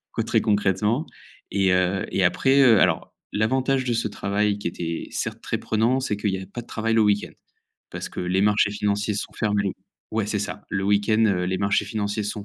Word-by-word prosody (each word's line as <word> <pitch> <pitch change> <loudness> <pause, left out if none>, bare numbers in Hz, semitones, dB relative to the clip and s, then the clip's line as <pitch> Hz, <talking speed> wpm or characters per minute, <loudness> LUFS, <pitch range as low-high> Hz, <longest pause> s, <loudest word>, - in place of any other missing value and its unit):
quoi, - - -1
très - - +1
concrètement, 105 - +1 0.4
et 95 -1 +2
heu, 90 +1 +1
et 95 - +2
après, 135 +10 +3
heu, 115 -7 +6
alors - - +1 0.2
l'avantage 130 +5 +1
de 120 - 0
ce 115 -1 0
travail 100 +1 -1
qui 95 - -2
était 85 -1 -5
certes - - -3
très - - -2
prenant, 115 +4 +1
c'est 105 -6 -2
qu'il 105 -1 0
y 95 - -1
a - - -7
pas 120 +4 -7
de 120 - -14
travail 115 0 -2
le 115 - +4
week-end. 105 -1 +1 0.6
Parce - - -5
que - - -6
les 90 +2 +1
marchés 105 0 +3
financiers 105 0 -1
sont 100 - -4
fermés. 105 -3 0 0.4
Ouais, 110 -1 -1
c'est 105 0 -1
ça, 100 0 -5
le 95 -1 -1
week-end 105 +2 +2 0.3
les 95 - 0
marchés 100 +1 +1
financiers 105 -1 -2
sont 105 0 -4
105 Hz, 205 wpm, -24 LUFS, 100-110 Hz, 0.6 s, heu